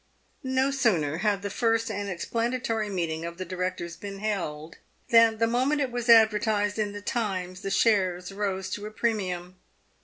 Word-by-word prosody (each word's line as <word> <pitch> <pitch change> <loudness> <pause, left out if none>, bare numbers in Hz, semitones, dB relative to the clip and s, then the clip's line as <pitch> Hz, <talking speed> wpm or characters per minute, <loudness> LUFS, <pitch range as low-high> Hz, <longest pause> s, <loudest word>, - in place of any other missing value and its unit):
No 260 0 +1
sooner 180 - +1
had 205 0 0
the 200 - -3
first 225 0 +1
and 205 -1 -3
explanatory 230 +3 -2
meeting 165 -4 -2
of 170 0 -6
the 185 - -5
directors 180 -2 -4
been 195 +3 -7
held, 170 -7 -4 0.3
than 230 -1 +6
the 230 - +3
moment 255 +6 +1
it 270 -3 -1
was 240 0 -3
advertised 215 -2 +4
in 210 -1 0
the 205 0 -8
Times 185 -6 -2
the 195 - -3
shares 185 -4 +2
rose 195 -1 -3
to 210 +2 -4
a - - -6
premium. 185 -6 -2
205 Hz, 165 wpm, -27 LUFS, 185-230 Hz, 0.3 s, than